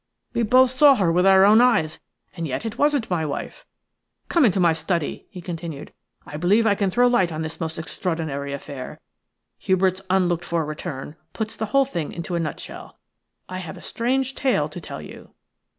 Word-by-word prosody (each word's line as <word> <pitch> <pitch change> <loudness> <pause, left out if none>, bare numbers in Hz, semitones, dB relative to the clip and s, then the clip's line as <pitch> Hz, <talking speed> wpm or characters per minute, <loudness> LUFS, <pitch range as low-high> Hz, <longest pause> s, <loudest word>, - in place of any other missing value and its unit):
We - - 0
both 255 +3 +5
saw 280 +1 +6
her 185 -7 +2
with 180 +3 +3
our 190 0 +7
own 215 +3 +7
eyes, 160 -11 +2 0.4
and 170 -2 -3
yet 135 - -3
it 225 +2 -5
wasn't 290 -6 +2
my 170 -3 +1
wife. 145 -2 -5 0.6
Come 335 -5 +4
into 195 -4 +2
my 170 -2 +4
study," 160 0 -3
he 180 - -9
continued; 165 -4 -7 0.3
"I 150 - -7
believe 200 +8 +3
I 215 - +4
can 200 -1 0
throw 245 +6 +3
light 190 -8 +2
on 160 0 -3
this 160 +1 -6
most 160 0 -3
extraordinary 160 -4 -3
affair. 140 -2 -7 0.6
Hubert's 185 0 +1
unlooked 175 -2 +2
for 165 -2 -1
return 150 -1 -6 0.2
puts 220 -1 -4
the 220 - -3
whole 275 +5 +3
thing 170 - -4
into 175 +2 -5
a 170 - 0
nutshell. 155 -3 -6 0.5
I 185 0 -5
have 170 -4 -7
a - - -12
strange 265 +3 -1
tale 250 - +1
to 170 +3 -8
tell 80 - -8
you." - - -13
180 Hz, 190 wpm, -23 LUFS, 160-220 Hz, 0.6 s, our